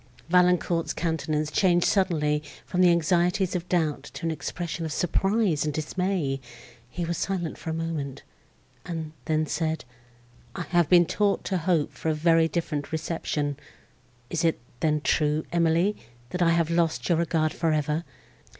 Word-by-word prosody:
Valancourt's 180 -1 +3
countenance 155 -2 -1
changed 175 -2 +3
suddenly 155 -7 +2 0.2
from 180 - 0
the 180 - +7
anxieties 175 +3 +2
of 180 0 -3
doubt 160 -6 +1
to 165 - -5
an 165 - +1
expression 165 +2 -4
of 160 - -3
surprise 190 -1 +1
and 150 -2 -2
dismay: 155 -3 -1 0.5
he 170 +6 -3
was 170 0 -2
silent 180 -4 -3
a - - 0
moment, 160 -4 -4 0.6
and 160 -3 -5
then 155 0 +1
said, 160 -2 -2 0.7
"I 180 - -3
had 175 0 +2
been 175 -1 +7
taught 205 +3 +1
to 190 -2 -1
hope 165 -3 +1
for 160 - -3
a 155 - +1
very 165 +1 +4
different 155 -4 -3
reception! 155 -2 -2 0.7
Is 170 - -1
it, 165 -1 +2 0.2
then, 150 -1 +1
true, 150 +1 +1
Emily, 170 +4 +2 0.4
that 180 - -3
I 170 - +5
have 165 -1 +2
lost 165 -8 +1
your 170 -2 +2
regard 160 -2 +1
for 165 -1 0
ever? 150 +1 0
165 Hz, 155 wpm, -26 LUFS, 155-175 Hz, 0.7 s, the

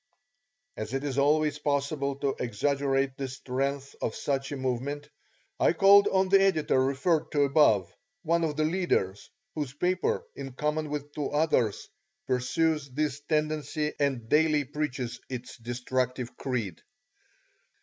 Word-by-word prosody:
As 110 +4 -4
it 135 - -2
is 140 -2 -1
always 150 +1 +2
possible 140 -1 -1
to 140 0 -1
exaggerate 135 +3 0
the 135 - -3
strength 135 +2 -3
of 110 - -2
such 135 -1 -2
a 145 - -3
movement 130 +3 -3 0.5
I - - +4
called 200 0 +7
on 190 0 +2
the 195 0 +6
editor 155 -8 +3
referred 140 +5 +1
to 145 -1 +4
above, 110 - +3 0.3
one 170 0 +2
of 155 -2 -1
the 155 - +2
leaders, 155 - 0 0.2
whose 145 -4 -4
paper, 180 +4 0
in 135 -2 -7
common 150 +3 -1
with 145 0 -4
two 145 -2 -2
others, 145 -8 +1 0.4
pursues 150 +4 0
this 145 +1 -1
tendency 155 -1 0
and 135 -6 0
daily 150 +1 +3
preaches 135 -4 -4
its 125 -1 -6
destructive 125 +1 -2
creed. 115 -10 -3
140 Hz, 140 wpm, -28 LUFS, 130-155 Hz, 0.5 s, called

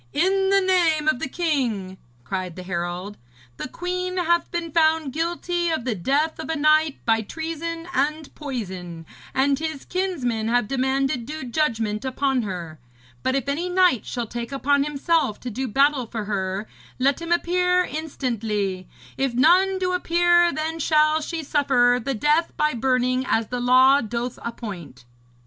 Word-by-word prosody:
'In 385 +4 +2
the 395 0 +4
name 340 -5 +2
of 310 -5 +2
the 275 - -3
king,' 245 - -1 0.2
cried 180 +4 -4
the 185 - -8
herald, 180 +2 -4 0.4
'the - - -5
queen 365 +4 -3
hath 345 -1 +1
been 340 -1 -4
found 315 -3 +2
guilty 345 +1 -1
of 315 -7 -2
the 250 - 0
death 280 - 0
of - - -6
a 320 - 0
knight 305 0 +3
by 225 -1 +3
treason 330 +6 -5
and 300 +3 -1
poison, 185 - -6 0.3
and 275 +1 +2
his 315 -3 -4
kinsmen 270 -13 -1
have 240 -2 +2
demanded 265 -1 0
due 310 -1 -5
judgment 230 -6 -1
upon 265 0 0
her. 175 -7 -6 0.4
But 260 0 0
if 275 -2 -1
any 320 +6 -1
knight 360 - +3
shall 240 -1 -3
take 235 +2 -6
upon 280 +1 +1
himself 295 -5 0
to 250 - -5
do 260 +5 -3
battle 275 +1 +2
for 220 -2 -5
her, 195 0 -2 0.3
let 275 +5 +1
him 335 0 -5
appear 360 +1 +2
instantly. 225 - -3 0.3
If 265 -3 -1
none 365 +8 +4
do 365 -1 -1
appear, 345 0 +3
then 320 +1 -3
shall 305 0 +3
she 325 +1 -4
suffer 250 -4 +3
the 270 +1 -2
death 300 +8 +2
by 300 0 +2
burning 255 +1 +1
as 225 -1 +1
the 245 - -3
law 260 +3 +5
doth 235 +2 -4
appoint.' 175 - -7
275 Hz, 160 wpm, -23 LUFS, 230-325 Hz, 0.4 s, law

